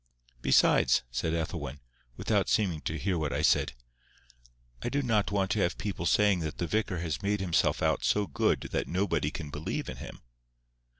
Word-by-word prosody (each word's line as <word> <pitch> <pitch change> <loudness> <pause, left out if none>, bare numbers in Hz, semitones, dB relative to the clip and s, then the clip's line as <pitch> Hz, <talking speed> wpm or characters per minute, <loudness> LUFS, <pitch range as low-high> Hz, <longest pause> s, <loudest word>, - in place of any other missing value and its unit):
"Besides," 65 -1 +4
said 80 +7 -1
Ethelwyn, 75 -4 -4 0.4
without - - +1
seeming 90 -8 +1
to 80 - -3
hear 90 +1 -1
what 75 -2 -1
I - - -1
said, - - +3 1.1
"I 120 - -2
do 145 +2 0
not 110 -4 +1
want 100 -1 0
to 110 - +1
have 85 -2 +1
people 90 -5 -3
saying 105 -3 +4
that 80 -1 -4
the 85 - -1
vicar 105 -1 -1
has 85 -1 -3
made 100 0 0
himself 90 -3 +1
out - - +1
so 105 0 +2
good - - +1
that - - -1
nobody 85 -5 0
can 75 -2 -7
believe 75 +2 -4
in - - -6
him." - - -10
90 Hz, 180 wpm, -29 LUFS, 80-100 Hz, 1.1 s, Besides